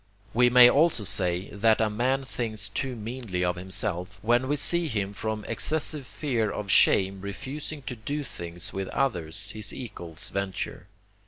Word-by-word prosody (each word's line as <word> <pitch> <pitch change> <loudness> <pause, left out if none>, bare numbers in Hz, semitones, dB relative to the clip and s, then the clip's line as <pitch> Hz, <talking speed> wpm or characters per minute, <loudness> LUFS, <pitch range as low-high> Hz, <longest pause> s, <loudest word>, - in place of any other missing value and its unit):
We 125 +1 +5
may 125 0 +9
also 145 -3 +4
say, 90 -1 0
that 110 +2 +3
a 110 - +3
man 125 +6 0
thinks 110 -6 -3
too 130 +5 -3
meanly 110 -5 -3
of 90 0 0
himself, 95 +1 -3
when 120 +3 +3
we 145 - +1
see 170 +4 +4
him 105 -6 -2
from 110 +1 -4
excessive 150 -3 -1
fear 120 -9 -1
of 100 -1 -3
shame 95 0 +5
refusing 140 +9 -6
to 125 - -5
do 145 +7 -4
things 85 -8 -6
which 95 -1 -3
others, 95 - -2
his 110 -1 -6
equals, 85 -10 -7
venture. 95 -2 -4
110 Hz, 160 wpm, -27 LUFS, 95-130 Hz, -, may